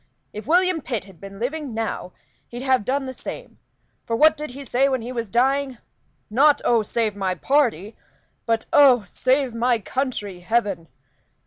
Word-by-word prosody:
If 210 - -8
William 360 0 +3
Pitt 240 -6 -3
had 190 -4 -17
been 195 0 -10
living 265 +2 -4
now 220 -5 -4 0.3
he'd 240 +2 -7
have 260 -4 +2
done 270 +4 -1
the 260 - -5
same; - - -9 0.4
for 230 - -2
what 310 +5 +5
did 300 0 -6
he 275 +3 -9
say 270 +3 +2
when 260 -4 -1
he 245 - -6
was 235 -3 -3
dying? 265 +4 +1 0.5
Not 280 +7 +4
'Oh, 235 -2 +4
save 215 -1 -1
my 190 -2 -1
party!' 230 - 0 0.5
but 225 -1 0
'Oh, 260 -6 +6
save 255 +6 0
my 240 +1 +2
country, 220 -5 -4
heaven!' 190 -3 -1
245 Hz, 165 wpm, -22 LUFS, 215-275 Hz, 0.5 s, Oh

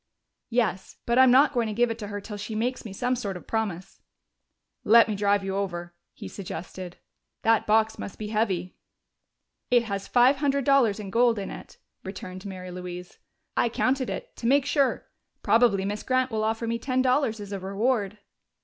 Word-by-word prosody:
"Yes. 220 -6 -1
But 235 +2 +2
I'm 260 -1 +7
not 275 +4 +5
going 240 -3 +1
to 215 - -4
give 240 +1 +2
it 225 - -5
to 210 - -5
her 205 0 -5
till 210 +1 -8
she 210 +2 -6
makes 245 +4 -2
me 215 - -7
some 245 +6 -1
sort 200 -6 -4
of - - -13
promise." 195 -5 -3 0.8
"Let 230 +2 +7
me 215 - -1
drive 200 0 +1
you 195 0 -3
over," 175 -3 -3 0.2
he - - -9
suggested. 185 -1 -7 0.5
"That 225 -1 +3
box 220 +1 +2
must 200 - -7
be 210 -1 -5
heavy." 195 -5 -1 0.9
"It 245 -1 +4
has 200 -3 -4
five 255 +3 +4
hundred 280 -1 0
dollars 255 -7 +3
in 200 -2 -7
gold 235 0 +3
in 195 - -4
it," - - -11 0.3
returned 185 0 -7
Mary 185 -1 -7
Louise. 180 0 -8 0.4
"I 240 - +2
counted 255 +2 0
it, - - -6
to 230 - -3
make 275 +2 +4
sure. 280 -2 +1 0.4
Probably 225 -5 +3
Miss 205 +1 -3
Grant 255 0 0
will 215 -1 -1
offer 225 +1 -1
me 230 0 -2
ten 255 0 0
dollars 255 -4 +1
as 205 -1 -8
a 200 - -3
reward." 205 +2 -1
220 Hz, 190 wpm, -26 LUFS, 195-245 Hz, 0.9 s, I'm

